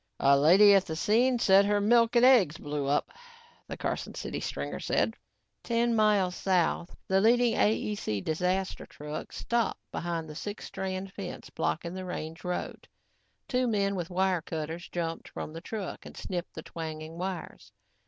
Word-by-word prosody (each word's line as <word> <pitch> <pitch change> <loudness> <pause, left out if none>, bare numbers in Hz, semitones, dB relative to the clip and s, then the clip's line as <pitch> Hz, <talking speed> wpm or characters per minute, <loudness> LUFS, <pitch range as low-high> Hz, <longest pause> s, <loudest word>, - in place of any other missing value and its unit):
"A 140 0 +5
lady 185 +9 +7
at 195 -1 +4
the 160 - -3
scene 240 +9 +3
said 195 -4 +6
her 205 0 +2
milk 230 +3 +4
and 240 +1 +6
eggs 210 - +5
blew 145 -1 -3
up," 145 +1 +1 0.6
the - - -6
Carson - - -3
City - - -4
stringer - - -4
said. 225 - 0 0.5
Ten 235 0 +1
miles 210 -4 +3
south, 180 -2 0
the 190 0 +3
leading 235 +2 +4
AEC 210 - 0
disaster 180 +4 -1
truck 150 +1 -7
stopped 235 -1 -1
behind 170 -2 -3
the 155 - -8
six 205 +7 -6
strand 190 0 -4
fence 195 -3 -7
blocking 170 +1 -2
the 185 0 -5
range 165 -2 -6
road. 180 0 -4 0.6
Two 250 -1 +1
men 200 -3 +1
with 175 -4 -3
wire 185 -1 +1
cutters, 160 +2 -5
jumped 165 -1 -4
from 155 - -6
the 165 - -7
truck 205 -1 -5
and - - -11
snipped 180 -2 -5
the - - -7
twanging 160 0 -7
wires. 175 - -5
185 Hz, 165 wpm, -29 LUFS, 165-210 Hz, 0.6 s, lady